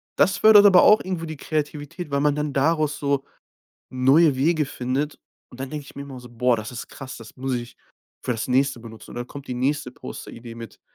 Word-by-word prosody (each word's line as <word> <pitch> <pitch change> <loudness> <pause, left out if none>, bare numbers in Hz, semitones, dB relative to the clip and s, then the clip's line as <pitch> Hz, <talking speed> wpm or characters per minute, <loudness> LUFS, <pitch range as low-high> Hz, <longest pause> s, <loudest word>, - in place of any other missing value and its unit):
das 195 - +3
fördert 210 -1 +8
aber 185 -3 +8
auch 210 +1 +7
irgendwo 185 -3 -4
die 155 -2 -7
Kreativität, 150 +2 -4
weil 140 0 +1
man 145 -1 +2
dann 150 -1 -2
daraus 155 +1 +1
so 140 -1 0 0.7
neue 135 +4 +4
Wege 155 +3 +2
findet. 135 +4 -3 0.3
Und 125 - -13
dann 135 - -5
denke 150 -2 -5
ich - - -14
mir 140 - -5
immer 135 -3 -9
so: 125 - -12
„Boah, 120 +1 +1
das 110 +1 -6
ist 125 - -7
krass, 130 -2 -9
das 115 -1 -13
muss 130 0 -2
ich 120 -1 -6 0.5
für 125 - -1
das 115 +2 -4
Nächste 130 -1 +2
benutzen.“ 115 -1 -12
Und - - -10
dann 120 0 -4
kommt 140 +1 -10
die 125 - -3
nächste 135 +1 -1
Posteridee 115 -1 -9
mit 115 -1 -10
140 Hz, 220 wpm, -23 LUFS, 125-150 Hz, 0.7 s, fördert